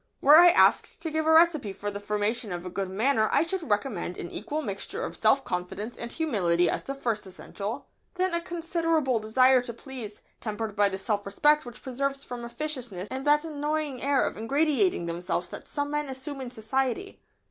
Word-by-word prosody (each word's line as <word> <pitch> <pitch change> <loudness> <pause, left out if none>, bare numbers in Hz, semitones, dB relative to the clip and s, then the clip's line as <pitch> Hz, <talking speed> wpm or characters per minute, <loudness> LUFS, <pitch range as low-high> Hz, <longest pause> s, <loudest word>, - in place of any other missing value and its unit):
] - - -49
Were 295 +3 +8
I 350 +1 +9
asked 345 - +4
to 320 - -3
give 315 0 -1
a - - +5
recipe 320 -9 +4
for 205 +1 -5
the 205 - -5
formation 210 +1 -1
of 175 0 -5
a 180 - -5
good 195 0 -3
manner 220 +3 +2
I - - +4
should 335 -3 -3
recommend 205 -4 -1
an 170 - -6
equal 310 +1 -4
mixture 235 - -4
of - - -6
self 275 - +3
confidence 185 +6 -4
and 235 0 -5
humility 180 - +1
as - - -2
the 275 - -5
first 230 -7 -2
essential, 200 +3 -6 0.3
then 370 -1 0
a 340 - 0
considerable 330 -6 0
desire 255 +4 +4
to 245 -1 -6
please, 235 -5 -9 0.2
tempered 215 -1 -4
by 205 0 +4
the 190 - -4
self 205 +1 -1
respect 295 +8 +2
which 240 - -11
preserves 275 +2 -2
from 245 -1 -7
officiousness 235 -7 -5
and 265 +2 -4
that 295 +2 +4
annoying 300 -3 -2
air 275 -1 +2
of - - -4
"ingratiating" 285 - +1
themselves 175 +1 -2
that - - -9
some 285 0 -3
men 295 -1 -1
assume 270 +1 -6
in 255 - -5
society. 255 - -2
255 Hz, 200 wpm, -27 LUFS, 205-300 Hz, 0.3 s, I